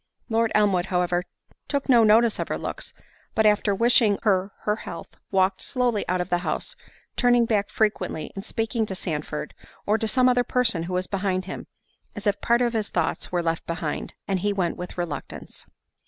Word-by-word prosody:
Lord 230 0 +2
Elmwood, 195 -4 +3
however, 180 -1 0 0.4
took 280 -1 -2
no 240 -4 +6
notice 220 +1 +4
of - - -2
her - - -2
looks, - - -5 0.4
but 220 - +3
after 210 -1 +3
wishing 230 -2 +4
her 195 -2 +2
her 210 0 0
health, 165 - -8 0.2
walked 190 -1 +2
slowly 245 -5 +1
out 180 0 +1
of 180 - -2
the 175 - +3
house; - - -3 0.4
turning 245 -1 +4
back 210 -3 0
frequently 210 -7 -1
and 195 - -6
speaking 225 0 -1
to 190 - -4
Sandford, 150 -4 -4 0.3
or 215 +2 +2
to 220 - -1
some 255 +3 +4
other 245 -1 +4
person 240 -9 +2
who - - -3
was 180 0 0
behind 190 -2 -1
him, 190 - -7 0.5
as 205 0 -6
if 205 -1 +1
part 235 +1 +3
of 240 -1 0
his 215 -2 -1
thoughts 170 -2 -1
were 175 -1 0
left 165 0 -2
behind, 165 -2 -4
and 195 -1 0
he 205 +3 0
went 185 -4 -1
with 180 +1 -8
reluctance. 175 -4 -6
205 Hz, 190 wpm, -25 LUFS, 180-230 Hz, 0.5 s, no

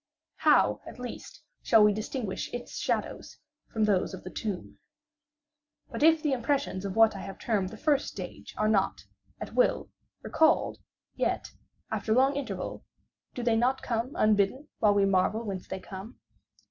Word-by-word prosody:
How - - +4
at - - -9
least 250 -1 -8 0.2
shall 225 -3 +5
we 210 0 +5
distinguish 215 0 -4
its 245 - -6
shadows - - -3 0.3
from 220 - 0
those 200 -2 +1
of 185 - -12
the 185 - -8
tomb? 205 -5 -5 1.1
But - - -5
if 320 0 +5
the 300 - +1
impressions 250 -6 -1
of 195 - -4
what 225 -1 +5
I - - -6
have 195 0 -7
termed 200 -5 -1
the 220 - -10
first 295 0 +1
stage - - -8
are 215 - +2
not, 195 -3 +1 0.4
at - - -7
will, - - +2 0.3
recalled, 315 0 +2 0.3
yet, - - -1 0.4
after 220 - 0
long 270 +2 +4
interval, 280 -1 -4 0.5
do 245 - -4
they 235 -1 +3
not 250 +4 +1
come 235 +3 -2
unbidden, 215 +7 +2
while 210 -2 +4
we 200 -1 +4
marvel 195 +3 +2
whence 195 -4 -5
they 190 - -5
come? 195 +5 -9
220 Hz, 160 wpm, -29 LUFS, 195-260 Hz, 1.1 s, shall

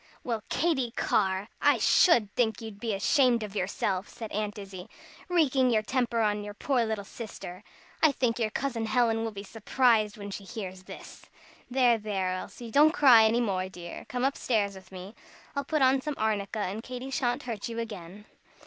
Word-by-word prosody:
"Well, 230 -3 -2
Katy 265 -4 +1
Carr, 190 0 +1
I - - +4
should 230 - +4
think 225 -3 +1
you'd 220 -3 -9
be 220 -2 -2
ashamed 240 +2 +3
of 210 -1 -7
yourself," 190 0 -2
said 225 -2 -8
Aunt 210 0 -3
Izzie, 195 0 -9 0.4
"wreaking 275 -7 +3
your 220 -3 +2
temper 240 -1 0
on 210 -1 0
your 205 0 -8
poor 255 +1 +1
little 220 -2 -3
sister! 200 -4 -9 0.4
I 315 - +6
think 245 -3 -1
your 220 -2 +1
Cousin 230 -1 -2
Helen 225 -2 +2
will 225 - -1
be 200 -1 -8
surprised 225 0 +1
when 205 -1 -7
she 200 - -6
hears 190 -2 -7
this. - - -11 0.4
There, 245 -2 +3
there, 195 -3 -2
Elsie! 225 +5 -7
Don't 300 +5 +5
cry 245 -8 +7
any 230 +2 +2
more, 190 -4 -1
dear. 175 -2 -9
Come 250 +1 -1
up 275 - 0
stairs 210 -5 0
with 190 -1 -14
me. 190 +2 -9 0.4
I'll 280 - -1
put 305 -1 +1
on 260 +1 +4
some 300 +1 -4
arnica, 215 -1 -1
and 205 +3 -3
Katy 255 +2 -7
sha'n't 245 -2 -1
hurt 230 -3 -5
you 230 - -6
again." 205 -3 -7
220 Hz, 185 wpm, -28 LUFS, 200-250 Hz, 0.4 s, cry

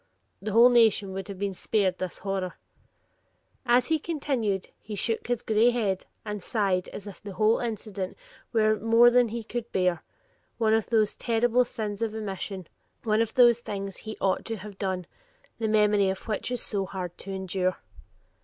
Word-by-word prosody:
The 210 +1 -3
whole 235 +2 +8
nation 220 -5 +4
would 190 -1 -5
have 200 -2 -7
been 200 0 -2
spared 190 -1 0
this 185 -2 -4
horror." 190 -2 -2 1.1
As 245 +1 +5
he 320 -1 +2
concluded 265 - -2
he 210 - -7
shook 225 +3 -1
his 245 -1 -1
gray 220 +2 +4
head 210 -6 -1 0.2
and 210 -1 -4
sighed 195 -3 0
as 200 - -8
if 200 -2 -10
the 205 -2 -8
whole 215 +4 +3
incident 215 -5 -4 0.3
were 215 -2 +3
more 230 +2 +6
than 245 0 +5
he 230 +1 -5
could 235 +1 -5
bear 180 -3 +1 0.6
one 220 -2 +2
of 225 -1 +2
those 220 -3 +2
terrible 240 +2 +2
sins 215 -4 -4
of 220 -1 -1
omission; 195 -3 -4 0.4
one 215 0 +2
of 225 -1 -2
the 240 -2 +7
things 200 -4 -6
he 215 0 -8
"ought 190 -1 +1
to 225 - -2
have 205 0 -10
done," 185 -2 -2 0.5
the 225 - 0
memory 210 -2 +3
of 190 +4 -5
which 215 +1 -2
is 245 -1 -1
so 195 -3 -1
hard 180 -2 -5
to 195 - -7
endure. 190 -1 -1
210 Hz, 180 wpm, -27 LUFS, 195-230 Hz, 1.1 s, whole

